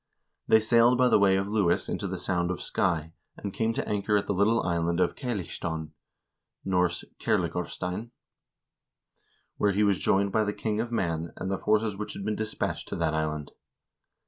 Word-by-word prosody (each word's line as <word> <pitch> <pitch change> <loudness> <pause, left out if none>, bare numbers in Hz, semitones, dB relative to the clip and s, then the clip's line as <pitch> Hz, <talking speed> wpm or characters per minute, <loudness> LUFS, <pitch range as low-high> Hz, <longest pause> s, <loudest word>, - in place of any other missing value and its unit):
He 110 - +6
sailed 115 +2 +5
by 125 0 +4
the - - +5
way 100 -1 +5
of 95 +1 0
Lewis 100 -5 +1
into - - -3
the - - -4
Sound 90 -1 -1
of 90 - -2
Skye 80 -3 -1 0.2
and 100 -2 -5
came 115 0 0
to - - -2
anchor 105 0 +1
at 100 - -1
the - - -1
little 105 +4 +3
island 85 0 0
of 90 - +2
Cailleachstone 85 - -4 0.7
(N. 95 - -3 0.5
Kerlingarstein), 90 +6 -2 1.5
where 105 -1 +2
he 105 +2 +2
was 100 -2 +3
joined 100 +1 +2
by 110 +1 +2
the 105 0 -1
king 110 0 -2
of 115 +1 -2
Man, 85 -7 -1
and 95 - -3
the 95 - -1
forces 105 -1 +1
which 105 - -5
had 100 - -6
been 105 0 0
dispatched 110 0 -3
to - - -4
that 80 - 0
island. 75 -1 -2
100 Hz, 180 wpm, -28 LUFS, 85-110 Hz, 1.5 s, He